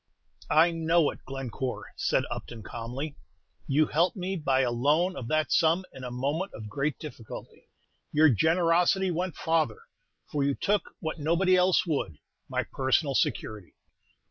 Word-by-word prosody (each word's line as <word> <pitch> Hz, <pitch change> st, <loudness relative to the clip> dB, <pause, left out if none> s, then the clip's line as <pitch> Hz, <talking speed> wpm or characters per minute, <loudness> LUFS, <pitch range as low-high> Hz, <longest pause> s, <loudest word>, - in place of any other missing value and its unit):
"I 165 Hz, +2 st, +5 dB
know 165 Hz, -1 st, +2 dB
it, -, -, -14 dB
Glencore," 130 Hz, -1 st, -5 dB
said -, -, +1 dB
Upton, 115 Hz, -3 st, -6 dB
calmly. 125 Hz, +8 st, -6 dB, 0.5 s
"You 150 Hz, +2 st, +3 dB
helped 170 Hz, +6 st, +1 dB
me 185 Hz, +1 st, -2 dB
by 135 Hz, -6 st, +1 dB
a 125 Hz, -2 st, +1 dB
loan 150 Hz, +10 st, +2 dB
of 120 Hz, -, -6 dB
that 155 Hz, +3 st, 0 dB
sum 165 Hz, +3 st, +3 dB
in 130 Hz, -, -10 dB
a 125 Hz, -, -4 dB
moment 145 Hz, +10 st, -2 dB
of 105 Hz, -2 st, -8 dB
great 140 Hz, +4 st, -1 dB
difficulty. 130 Hz, -8 st, -10 dB, 0.4 s
Your 155 Hz, +1 st, +6 dB
generosity 170 Hz, -, +3 dB
went 175 Hz, +1 st, -2 dB
farther, 160 Hz, -9 st, 0 dB, 0.4 s
for 145 Hz, -2 st, -2 dB
you 140 Hz, 0 st, +1 dB
took, 205 Hz, 0 st, -1 dB
what 160 Hz, -1 st, -4 dB
nobody 170 Hz, +5 st, +3 dB
else 180 Hz, +1 st, +4 dB
would, 140 Hz, -, -2 dB, 0.3 s
my -, -, 0 dB
personal 135 Hz, +2 st, 0 dB
security." 110 Hz, -, -2 dB
155 Hz, 150 wpm, -28 LUFS, 130-170 Hz, 0.5 s, Your